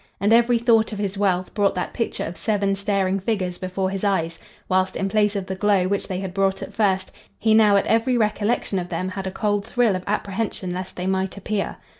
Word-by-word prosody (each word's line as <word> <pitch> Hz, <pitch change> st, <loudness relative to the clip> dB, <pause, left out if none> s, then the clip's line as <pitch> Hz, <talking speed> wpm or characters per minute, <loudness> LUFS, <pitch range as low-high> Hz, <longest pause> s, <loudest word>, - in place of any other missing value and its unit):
And 205 Hz, +3 st, +3 dB
every 235 Hz, +1 st, +5 dB
thought 230 Hz, -1 st, +3 dB
of 210 Hz, -, -5 dB
his 200 Hz, -1 st, -2 dB
wealth 185 Hz, -2 st, 0 dB
brought 200 Hz, -2 st, +2 dB
that 180 Hz, -, -3 dB
picture 230 Hz, -, -2 dB
of 170 Hz, -, -5 dB
seven 200 Hz, +1 st, 0 dB
staring 195 Hz, -1 st, 0 dB
figures 185 Hz, -3 st, -2 dB
before 190 Hz, +1 st, -2 dB
his 195 Hz, 0 st, -4 dB
eyes, 170 Hz, -5 st, 0 dB, 0.3 s
whilst, 185 Hz, 0 st, +1 dB
in 195 Hz, -, -1 dB
place 210 Hz, 0 st, +2 dB
of 195 Hz, -2 st, -2 dB
the 190 Hz, -, -4 dB
glow 195 Hz, -1 st, +2 dB
which 200 Hz, +1 st, -1 dB
they 185 Hz, -1 st, -3 dB
had 190 Hz, -2 st, -5 dB
brought 195 Hz, 0 st, 0 dB
at -, -, -9 dB
first, 190 Hz, -3 st, +1 dB, 0.3 s
he 220 Hz, -1 st, +2 dB
now 215 Hz, -2 st, +6 dB
at 200 Hz, -, +3 dB
every 230 Hz, +3 st, +2 dB
recollection 210 Hz, -2 st, 0 dB
of 175 Hz, 0 st, -5 dB
them 185 Hz, -, -2 dB
had 190 Hz, 0 st, -5 dB
a -, -, -3 dB
cold 205 Hz, 0 st, 0 dB
thrill 230 Hz, -2 st, +1 dB
of 185 Hz, -, -4 dB
apprehension 200 Hz, -2 st, -2 dB
lest 185 Hz, +1 st, -6 dB
they 180 Hz, -, -4 dB
might 190 Hz, +1 st, -1 dB
appear. 200 Hz, +1 st, -3 dB
195 Hz, 225 wpm, -23 LUFS, 185-210 Hz, 0.3 s, now